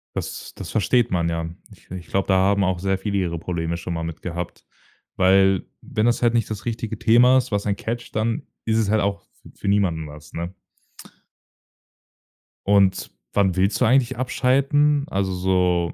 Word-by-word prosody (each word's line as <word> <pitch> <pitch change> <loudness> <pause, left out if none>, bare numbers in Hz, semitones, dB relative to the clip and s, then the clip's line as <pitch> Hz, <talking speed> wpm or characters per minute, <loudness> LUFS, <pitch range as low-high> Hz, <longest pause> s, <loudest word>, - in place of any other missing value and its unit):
Das - - -5
das - - -8
versteht 120 +2 +2
man, 85 -2 +1
ja. 85 0 -3 0.2
Ich - - -19
ich 90 -1 -8
glaube, 95 0 -1
da 95 - +3
haben 100 +1 +3
auch 90 -2 0
sehr 95 0 0
viele 100 0 -2
ihre 85 -3 -1
Probleme 85 -1 -3
schon 85 +1 -5
mal 80 0 -3
mit 80 -1 -6
gehabt. 90 0 -6 0.5
Weil, 95 0 +4 0.2
wenn 110 +1 -1
das 120 - +1
halt 120 0 +3
nicht 115 -2 +1
das 110 0 -6
richtige 115 -2 -3
Thema 120 +3 +5
ist, 125 - -1
was 100 0 -1
ein 100 - +1
catched, 115 +2 -5
dann 110 +1 -1 0.2
ist 110 0 +1
es 110 -3 +1
halt 110 0 +2
auch 100 0 -1 0.2
f - - -13
für - - -5
niemanden 90 -6 +1
was, 75 +1 -13
ne? 85 +3 -5 2.1
Und 100 -2 +3 0.2
wann 95 -3 +2
willst 95 +3 +1
du - - +5
eigentlich 130 +1 +2
abschalten? 140 +3 +2
Also, 95 -1 -1
so 90 -2 +1
100 Hz, 185 wpm, -22 LUFS, 90-115 Hz, 2.1 s, Thema